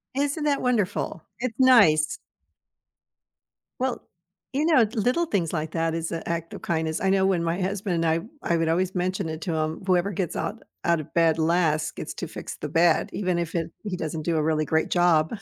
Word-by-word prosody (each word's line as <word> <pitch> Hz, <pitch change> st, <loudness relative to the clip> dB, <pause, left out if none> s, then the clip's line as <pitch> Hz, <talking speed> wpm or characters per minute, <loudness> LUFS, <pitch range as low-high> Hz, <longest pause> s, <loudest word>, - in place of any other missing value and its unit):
Isn't 285 Hz, +2 st, 0 dB
that 285 Hz, -2 st, +1 dB
wonderful? 205 Hz, -8 st, -1 dB, 0.2 s
It's 240 Hz, -3 st, -3 dB
nice. 205 Hz, -13 st, +5 dB, 1.6 s
Well, 260 Hz, -1 st, -1 dB, 0.5 s
you 295 Hz, +3 st, +1 dB
know, 305 Hz, -8 st, +5 dB
the 215 Hz, +1 st, -4 dB
little 255 Hz, +11 st, +2 dB
things 185 Hz, -, -1 dB
like 155 Hz, 0 st, -2 dB
that 165 Hz, -1 st, 0 dB
is 165 Hz, 0 st, -3 dB
an 165 Hz, -, -4 dB
act 165 Hz, -1 st, -3 dB
of -, -, -8 dB
kindness. 160 Hz, -1 st, -1 dB
I 190 Hz, -, +2 dB
know 190 Hz, 0 st, +3 dB
when 180 Hz, -3 st, +1 dB
my 170 Hz, +3 st, -1 dB
husband 185 Hz, -3 st, -1 dB
and -, -, +1 dB
I 160 Hz, +1 st, +2 dB, 0.3 s
I -, -, +3 dB
would 165 Hz, 0 st, 0 dB
always 180 Hz, +3 st, +1 dB
mention 180 Hz, -2 st, -1 dB
it 160 Hz, 0 st, -5 dB
to 170 Hz, -, -2 dB
him, 155 Hz, +2 st, -2 dB
whoever 185 Hz, +1 st, +2 dB
gets 175 Hz, -2 st, -3 dB
out 220 Hz, +3 st, -3 dB, 0.2 s
out 170 Hz, -1 st, +2 dB
of 155 Hz, +1 st, -9 dB
bed 165 Hz, -1 st, +3 dB
last, 160 Hz, -1 st, +1 dB
gets -, -, -6 dB
to -, -, -5 dB
fix -, -, -7 dB
the -, -, -5 dB
bed, 170 Hz, +3 st, +3 dB
even 185 Hz, -3 st, 0 dB
if 170 Hz, 0 st, -4 dB
it 165 Hz, 0 st, -2 dB
he 200 Hz, -4 st, -3 dB
doesn't 155 Hz, -2 st, -4 dB
do 170 Hz, 0 st, 0 dB
a 155 Hz, -, +1 dB
really 155 Hz, -1 st, +1 dB
great 160 Hz, +1 st, +1 dB
job. 175 Hz, +2 st, +3 dB
170 Hz, 210 wpm, -25 LUFS, 160-200 Hz, 1.6 s, nice